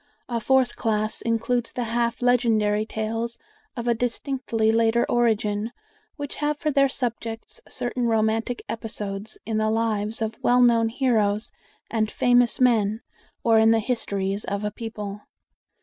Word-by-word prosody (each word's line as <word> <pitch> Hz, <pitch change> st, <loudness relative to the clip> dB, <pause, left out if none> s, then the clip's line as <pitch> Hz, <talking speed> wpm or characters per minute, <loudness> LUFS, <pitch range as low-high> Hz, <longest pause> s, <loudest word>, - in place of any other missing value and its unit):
A 235 Hz, -2 st, -1 dB
fourth 260 Hz, +2 st, +2 dB
class 215 Hz, -2 st, -1 dB
includes 235 Hz, +1 st, 0 dB
the 245 Hz, -, -3 dB
half 235 Hz, +1 st, -1 dB
legendary 220 Hz, -4 st, +2 dB
tales 225 Hz, +2 st, -3 dB, 0.4 s
of 235 Hz, 0 st, -4 dB
a 240 Hz, -, +4 dB
distinctly 235 Hz, -1 st, 0 dB
later 230 Hz, +1 st, +3 dB
origin, 220 Hz, -2 st, +1 dB, 0.4 s
which 285 Hz, -2 st, -6 dB
have 295 Hz, 0 st, 0 dB
for 305 Hz, 0 st, -1 dB
their 275 Hz, -1 st, +4 dB
subjects 230 Hz, -3 st, -4 dB
certain 245 Hz, 0 st, -2 dB
romantic 225 Hz, +2 st, 0 dB
episodes 210 Hz, -2 st, -5 dB
in 220 Hz, -1 st, -1 dB
the 215 Hz, 0 st, +1 dB
lives 220 Hz, -1 st, 0 dB
of 220 Hz, 0 st, -5 dB
well 250 Hz, 0 st, +4 dB
known 230 Hz, -2 st, +4 dB
heroes 225 Hz, -4 st, +1 dB, 0.4 s
and 220 Hz, -2 st, +1 dB
famous 245 Hz, 0 st, +3 dB
men, 225 Hz, -3 st, +3 dB, 0.4 s
or 225 Hz, -1 st, +5 dB
in 220 Hz, 0 st, +5 dB
the 225 Hz, -, +5 dB
history 200 Hz, -4 st, -1 dB
of 200 Hz, +1 st, -2 dB
a 210 Hz, -, -1 dB
people. 210 Hz, -2 st, -6 dB
225 Hz, 145 wpm, -24 LUFS, 215-245 Hz, 0.4 s, or